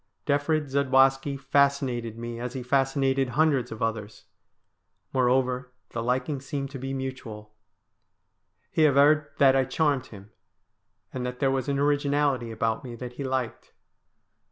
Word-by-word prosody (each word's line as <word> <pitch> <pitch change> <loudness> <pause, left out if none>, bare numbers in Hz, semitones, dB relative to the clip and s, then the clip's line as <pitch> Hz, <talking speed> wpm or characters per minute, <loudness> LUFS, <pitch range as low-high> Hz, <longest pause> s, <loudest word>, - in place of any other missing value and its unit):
Defrid 145 +1 +1
Zadwaski 135 0 +3
fascinated 135 -4 +1
me 120 0 -6
as 125 +1 -5
he 130 - -4
fascinated 135 0 +1
hundreds 135 -2 +1
of 110 - -5
others. 110 -2 -4 0.9
Moreover, 125 0 +1 0.2
the 115 - -3
liking 130 +4 -1
seemed 135 -1 -4
to 135 - -7
be 135 +1 -4
mutual. 125 -6 -6 1.2
He 155 -1 +4
averred 150 +2 +4
that 135 -1 +5
I 135 - +4
charmed 140 -1 0
him, 100 0 -13 0.8
and 130 - -4
that 125 0 -4
there 135 -2 +2
was 135 0 -1
an 140 - 0
originality 145 -3 +1
about 115 0 -2
me 120 -2 -7
that 125 +1 -7
he 140 - -6
liked. 130 -3 -3
135 Hz, 140 wpm, -26 LUFS, 125-140 Hz, 1.2 s, that